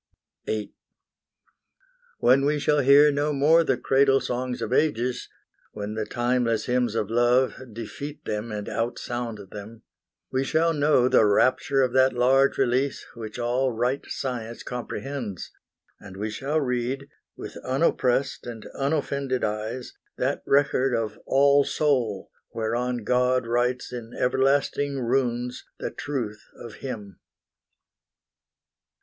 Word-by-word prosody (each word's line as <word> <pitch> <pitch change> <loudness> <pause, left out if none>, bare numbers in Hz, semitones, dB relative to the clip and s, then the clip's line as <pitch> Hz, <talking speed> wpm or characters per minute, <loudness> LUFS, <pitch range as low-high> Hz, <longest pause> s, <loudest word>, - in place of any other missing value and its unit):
VIII 110 -1 -3 1.4
When 130 +3 +4
we 150 +1 +2
shall 150 0 +2
hear 145 +2 +6
no 145 +1 0
more 150 +4 +4
the 135 -5 +1
cradle 135 0 +3
songs 125 0 -3
Of 120 - -3
ages 125 -4 0 0.4
when 105 +1 -5
the 110 -1 -3
timeless 120 -2 0
hymns 125 -3 0
of 110 -2 -1
Love 120 +2 +3 0.2
Defeat 115 +7 -7
them 105 +2 -3
and 105 -1 -5
outsound 115 -3 -4
them 110 +2 -10 0.5
we 130 +1 +1
shall 160 +4 +2
know 145 -4 +3
The 120 - +5
rapture 130 +6 +3
of 125 -2 0
that 130 0 +4
large 130 +3 +3
release 135 +1 0
which 110 -2 -8
all 125 +2 0
Right 125 +4 -1
science 120 -3 -4
comprehends; 120 -3 -5 0.5
and 95 -1 -11
we 105 +2 -3
shall 140 +7 -1
read, 130 0 -2 0.3
With - - -8
unoppressed 130 -2 0
and 115 -2 -7
unoffended 140 -2 -1
eyes, 110 +4 -3 0.2
That - - -1
record 135 -2 +3
of 110 -2 -3
All 140 +1 +5
Soul 125 -11 0 0.2
whereon 120 +2 -2
God 125 +1 +2
writes 120 +2 -1
In 120 -1 -7
everlasting 135 +2 +1
runes 125 0 -1
the - - -4
truth 120 -8 -4
of 115 -3 -10
Him. 105 -8 -7
125 Hz, 125 wpm, -25 LUFS, 115-135 Hz, 1.4 s, hear